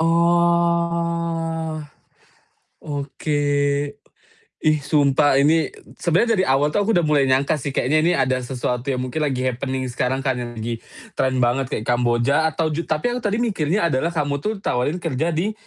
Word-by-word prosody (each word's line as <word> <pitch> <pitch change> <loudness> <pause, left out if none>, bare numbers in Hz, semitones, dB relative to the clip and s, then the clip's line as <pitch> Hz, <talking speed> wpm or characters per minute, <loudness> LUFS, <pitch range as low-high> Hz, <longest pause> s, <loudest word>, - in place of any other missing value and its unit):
Oh 170 -1 +1 1.0
Oke. 145 0 -3 1.3
Ih 155 -1 +3
sumpah 145 -1 +3
ini 155 +4 +3
eee, - - -17
sebenernya 180 +8 +2
dari - - +3
awal 140 +3 +2
tuh 205 - +1
aku 225 - +3
udah 175 - +3
mulai 145 -3 +2
nyangka 140 +3 +2
sih, 140 - -4
kayaknya 140 +3 +1
ini 170 +3 +3
ada 130 -2 +1
sesuatu 125 0 -3
yang 135 - 0
mungkin 130 +5 -4
lagi 130 -4 -1
happening 130 +1 -2
sekarang 130 +2 -1
kan 130 -2 0
yang 120 -1 -6
lagi 115 +1 -4 0.3
trend 130 0 0
banget 125 +1 +1
kayak 110 - -3
Kamboja 120 +6 +2
atau 160 0 -1
ju 155 - -2
tapi 155 +10 0
yang 250 - -3
tadi 210 -1 -1
mikirnya 190 -6 0
adalah 130 +6 +1
kamu 145 -4 -2
tuh 215 - -1
tawarin 125 +7 0
kerja 160 -2 -2
di, 195 +7 0
150 Hz, 165 wpm, -21 LUFS, 130-170 Hz, 1.3 s, Ih